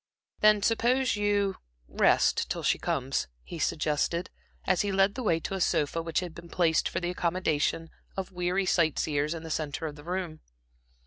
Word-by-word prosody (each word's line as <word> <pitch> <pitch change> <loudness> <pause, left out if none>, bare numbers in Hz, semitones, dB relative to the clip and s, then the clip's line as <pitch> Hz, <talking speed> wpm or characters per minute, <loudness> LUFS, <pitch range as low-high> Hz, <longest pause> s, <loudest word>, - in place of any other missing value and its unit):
"Then 210 -1 +5
suppose 240 +3 +2
you 205 -2 +1 0.3
a - - -24
rest - - +3
till - - -3
she - - +2
comes?" - - -1 0.2
he 170 - -8
suggested, 160 +2 0 0.3
as 185 - +2
he 205 -1 -1
led 195 +1 +3
the 255 - -5
way 170 -8 +2
to - - -4
a 190 - -2
sofa 155 0 +1
which 165 +1 -1
had 175 -3 -6
been 170 +1 -11
placed 165 -3 +2
for 170 - -2
the 175 0 -2
accommodation 165 -2 0 0.3
of 190 0 -4
weary 180 +2 0
sight 165 -4 +2
seers 150 +1 0
in 165 - -7
the 160 - -6
centre 155 +1 -2
of 150 -2 -5
the 145 - -12
room. 175 -2 -4
175 Hz, 190 wpm, -28 LUFS, 160-195 Hz, 0.3 s, Then